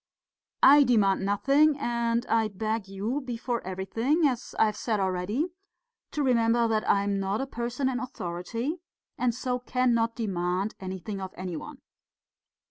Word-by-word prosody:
"I 290 Hz, +2 st, +9 dB
demand 205 Hz, -7 st, +3 dB
nothing, 275 Hz, +10 st, +3 dB
and 235 Hz, -2 st, 0 dB
I 225 Hz, -1 st, +2 dB
beg 215 Hz, +1 st, -3 dB
you, 210 Hz, +9 st, -3 dB
before 240 Hz, -1 st, -3 dB
everything 225 Hz, -, 0 dB
as 255 Hz, -4 st, -1 dB
I -, -, +5 dB
have 215 Hz, -1 st, -1 dB
said 215 Hz, -1 st, -1 dB
already 190 Hz, -, -1 dB, 0.6 s
to 295 Hz, -, -2 dB
remember 235 Hz, -2 st, +3 dB
that 215 Hz, -1 st, 0 dB
I 200 Hz, -, +4 dB
am 200 Hz, -1 st, 0 dB
not 195 Hz, +2 st, -1 dB
a 270 Hz, -, -1 dB
person 245 Hz, +1 st, -2 dB
in 260 Hz, -1 st, -1 dB
authority 230 Hz, -, -4 dB, 0.4 s
and 245 Hz, -2 st, +1 dB
so 250 Hz, 0 st, -2 dB
cannot 240 Hz, -2 st, +1 dB
demand 190 Hz, -2 st, -1 dB
anything 190 Hz, +2 st, -5 dB
of 190 Hz, -1 st, -7 dB
any 180 Hz, -1 st, -4 dB
one. -, -, -8 dB
230 Hz, 150 wpm, -27 LUFS, 195-250 Hz, 0.6 s, I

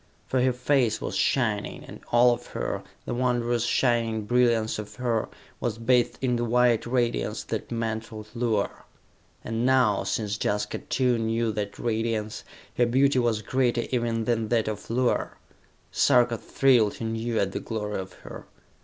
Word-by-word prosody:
For 130 Hz, -, 0 dB
her 130 Hz, +1 st, +3 dB
face 125 Hz, -2 st, +1 dB
was -, -, -4 dB
shining, 110 Hz, -6 st, 0 dB
and -, -, -11 dB
all 120 Hz, +1 st, +6 dB
of -, -, -7 dB
her, -, -, -2 dB, 0.2 s
the -, -, -3 dB
wondrous 120 Hz, -1 st, 0 dB
shining 115 Hz, -3 st, +1 dB
brilliance 115 Hz, -2 st, +2 dB
of 105 Hz, -1 st, -8 dB
her, 120 Hz, -3 st, -1 dB, 0.3 s
was 115 Hz, -2 st, -2 dB
bathed 120 Hz, +1 st, +2 dB
in 125 Hz, -2 st, +2 dB
the 120 Hz, -, -1 dB
white 120 Hz, 0 st, +2 dB
radiance 120 Hz, -, 0 dB
that -, -, -4 dB
mantled 110 Hz, -2 st, -4 dB
Luar. 115 Hz, -4 st, -1 dB, 0.6 s
And 115 Hz, +1 st, -2 dB
now, 125 Hz, -5 st, +3 dB
since 105 Hz, -1 st, -2 dB
Jaska 105 Hz, 0 st, -1 dB
too 125 Hz, -2 st, 0 dB
knew 115 Hz, 0 st, 0 dB
that 105 Hz, -1 st, -4 dB
radiance, 110 Hz, -2 st, -2 dB, 0.3 s
her 120 Hz, -, +4 dB
beauty 135 Hz, +2 st, +3 dB
was 115 Hz, -3 st, 0 dB
greater 125 Hz, 0 st, +1 dB
even 115 Hz, -2 st, 0 dB
than 115 Hz, -2 st, 0 dB
that 115 Hz, -1 st, +1 dB
of 105 Hz, -2 st, -5 dB
Luar. 125 Hz, +1 st, 0 dB, 0.5 s
Sarka 120 Hz, -1 st, +4 dB
thrilled 120 Hz, -6 st, +2 dB
anew 115 Hz, 0 st, -2 dB
at 95 Hz, -, 0 dB
the -, -, -3 dB
glory 105 Hz, -3 st, -4 dB
of 95 Hz, -1 st, -7 dB
her. -, -, -9 dB
115 Hz, 155 wpm, -26 LUFS, 110-125 Hz, 0.6 s, all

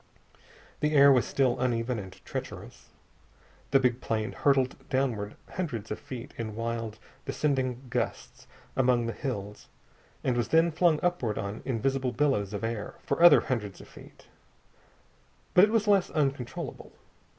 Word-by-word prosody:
The 150 Hz, 0 st, +1 dB
air 140 Hz, 0 st, +8 dB
was 125 Hz, -3 st, +3 dB
still 130 Hz, -3 st, +1 dB
uneven 120 Hz, -1 st, 0 dB
and 95 Hz, -2 st, -8 dB
treacherous. -, -, -7 dB, 0.8 s
The 135 Hz, -, +5 dB
big 125 Hz, -1 st, +1 dB
plane 110 Hz, -1 st, -1 dB
hurtled 135 Hz, -2 st, +2 dB
downward 120 Hz, -6 st, -1 dB, 0.2 s
hundreds 120 Hz, -, -4 dB
of 105 Hz, -, -3 dB
feet 130 Hz, +1 st, -8 dB
in 110 Hz, -2 st, -4 dB
wild 115 Hz, -1 st, -3 dB, 0.3 s
descending 135 Hz, -3 st, -1 dB
gusts 125 Hz, 0 st, -4 dB, 0.3 s
among 125 Hz, -2 st, +3 dB
the 115 Hz, -, -2 dB
hills, 105 Hz, -7 st, -5 dB, 0.6 s
and 125 Hz, -, +1 dB
was 120 Hz, -, 0 dB
then 165 Hz, +1 st, +4 dB
flung 160 Hz, -1 st, +3 dB
upward 175 Hz, -12 st, 0 dB
on 100 Hz, +2 st, -4 dB
invisible 130 Hz, +1 st, 0 dB
billows 120 Hz, -7 st, +1 dB
of 105 Hz, +1 st, -5 dB
air 115 Hz, -2 st, -3 dB
for 140 Hz, -, -1 dB
other 175 Hz, -, +9 dB
hundreds 105 Hz, -7 st, -3 dB
of -, -, -12 dB
feet. -, -, -15 dB, 1.3 s
But 180 Hz, -, +8 dB
it -, -, -4 dB
was 220 Hz, -2 st, +1 dB
less 200 Hz, -3 st, +4 dB
uncontrollable. 135 Hz, -5 st, -3 dB
125 Hz, 145 wpm, -28 LUFS, 115-140 Hz, 1.3 s, other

